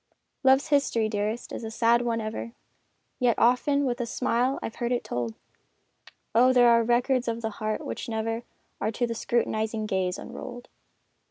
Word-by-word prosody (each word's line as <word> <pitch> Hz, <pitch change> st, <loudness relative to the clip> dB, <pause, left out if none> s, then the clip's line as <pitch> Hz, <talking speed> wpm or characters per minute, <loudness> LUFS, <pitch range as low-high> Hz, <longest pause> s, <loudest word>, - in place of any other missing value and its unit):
Love's 265 Hz, +3 st, +4 dB
history, 275 Hz, -6 st, +2 dB
dearest, 215 Hz, +2 st, -3 dB
is -, -, -5 dB
a 220 Hz, -, -4 dB
sad 235 Hz, +1 st, +3 dB
one 235 Hz, -1 st, -1 dB
ever, 220 Hz, +1 st, -5 dB, 0.7 s
Yet 245 Hz, -3 st, +2 dB
often 280 Hz, +4 st, +3 dB
with 245 Hz, -1 st, -1 dB
a 235 Hz, -, -2 dB
smile 250 Hz, +2 st, 0 dB
I've 225 Hz, -, -5 dB
heard 240 Hz, 0 st, -1 dB
it 245 Hz, -, 0 dB
told! 120 Hz, -2 st, -3 dB, 1.0 s
Oh, 250 Hz, +3 st, +6 dB
there 245 Hz, -1 st, +6 dB
are 230 Hz, 0 st, +5 dB
records 245 Hz, +2 st, +1 dB
of 230 Hz, 0 st, -2 dB
the 220 Hz, -, -1 dB
heart 215 Hz, 0 st, -2 dB
which -, -, -5 dB
never 225 Hz, +1 st, -2 dB, 0.4 s
Are 215 Hz, -, 0 dB
to 240 Hz, +2 st, 0 dB
the 230 Hz, -, -3 dB
scrutinizing 220 Hz, -1 st, -1 dB
gaze 190 Hz, -3 st, -1 dB
unrolled! 245 Hz, 0 st, -8 dB
235 Hz, 170 wpm, -27 LUFS, 220-245 Hz, 1.0 s, Oh